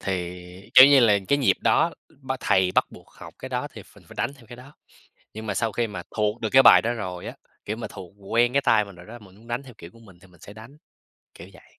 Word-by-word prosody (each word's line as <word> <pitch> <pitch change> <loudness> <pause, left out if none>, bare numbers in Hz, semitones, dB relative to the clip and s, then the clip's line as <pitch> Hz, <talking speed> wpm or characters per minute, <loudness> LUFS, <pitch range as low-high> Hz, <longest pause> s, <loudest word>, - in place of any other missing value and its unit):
Thì, 90 +1 -7
kiểu 130 - +10
như 140 -1 +5
là, 105 -4 +4
cái 140 - +2
nhịp 135 - +2
đó, - - +2 0.3
b - - -4
thầy 95 -1 +1
bắt - - +2
buộc - - -16
học - - -14
cái - - -8
đó - - -4
thì - - -11
phình - - -21
phải - - -14
đánh 140 - -3
theo 125 -5 -20
cái 120 - -12
đó. 130 +3 -15 0.6
Nhưng 110 +1 -8
mà 100 - -3
sau 115 0 -2
khi 120 +2 -1
mà 105 - -8
thuộc 105 +1 -1
được 110 - -2
cái 135 0 +7
bài - - +7
đó 120 +2 -1
rồi 90 -6 -7
á, - - -7 0.3
kiểu 105 - -5
mà, 120 - -6
thuộc 95 -3 -11 0.2
quen 120 +1 +2
cái 140 +1 +1
tay 105 - +2
mình 100 -2 -14
rồi 85 0 -15
đó, 120 +2 -11
mình 95 -4 -18
muốn 110 +3 -20
đánh 120 +3 -4
theo 130 -4 -15
kiểu 85 - -12
của 115 - -20
mình 100 -6 -18
thì 95 - -19
mình 90 -3 -23
sẽ 100 - -13
đánh, 110 +7 -14 0.6
kiểu 85 - -13
vậy. 95 - -21
110 Hz, 280 wpm, -23 LUFS, 95-120 Hz, 0.6 s, kiểu